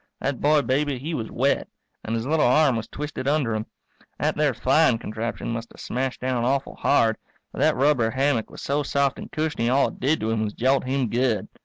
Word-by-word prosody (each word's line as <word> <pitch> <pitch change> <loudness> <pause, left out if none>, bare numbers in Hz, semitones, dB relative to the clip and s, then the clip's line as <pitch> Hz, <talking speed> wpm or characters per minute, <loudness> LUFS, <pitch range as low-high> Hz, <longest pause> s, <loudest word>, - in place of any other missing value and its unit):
That 135 -2 -2
boy 150 0 +4
baby, 140 +1 0
he 150 +7 -5
was 115 -7 -3
wet, 135 +3 0 0.4
and 115 - -2
his 115 0 -2
little 155 0 +2
arm 140 0 +4
was 115 -1 -3
twisted 145 -1 -5
under 140 -6 +1
him. 110 0 -3 0.5
That 150 +3 0
there 145 -4 +1
flying 130 +2 +3
contraption 115 +2 -4
must 115 0 -5
have - - -16
smashed 130 +1 -3
down 125 -2 0
awful 135 +3 0
hard, 115 -6 +2 0.3
but - - -8
that - - +3
rubber 130 -4 +3
hammock 130 -2 0
was - - -10
so 145 +2 0
soft 140 -1 0
and - - -9
cushiony 150 -7 -1
all 135 +2 +3
it - - -13
did 145 +5 +1
to 110 +1 -1
him 110 -1 0
was 105 -1 -3
jolt 130 +2 +2
him 130 -1 0
good. 120 -1 0
130 Hz, 215 wpm, -24 LUFS, 115-145 Hz, 0.5 s, boy